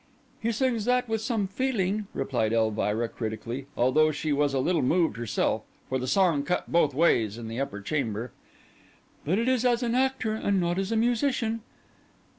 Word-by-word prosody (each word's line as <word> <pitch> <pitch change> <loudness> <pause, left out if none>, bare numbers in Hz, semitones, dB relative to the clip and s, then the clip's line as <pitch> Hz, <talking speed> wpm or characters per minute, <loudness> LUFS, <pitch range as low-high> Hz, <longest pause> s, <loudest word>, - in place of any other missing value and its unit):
"He 230 +1 0
sings 235 -2 0
that 250 0 +2
with 225 -1 -1
some 220 -3 0
feeling," 210 -2 -1
replied 120 -5 0
Elvira, 110 0 +1
critically, 115 +4 -5
although 155 +6 +4
she 150 0 -2
was 145 0 +2
a - - +2
little 170 +5 +1
moved 165 +6 +2
herself, 115 -4 -1 0.3
for 130 - 0
the 130 - -4
song 175 -3 +3
cut 180 +5 -2
both 150 -5 +3
ways 115 -9 +2
in 115 -1 -7
the 115 +2 -5
upper 135 -7 -3
chamber; 115 -2 -2 0.9
"but 175 +7 +1
it 230 +2 0
is 255 -2 +2
as 245 -1 +2
an 235 -1 0
actor 260 -3 +1
and 200 -3 0
not 175 +1 0
as 195 +2 -2
a - - +1
musician." 230 0 +1
170 Hz, 180 wpm, -27 LUFS, -, 0.9 s, although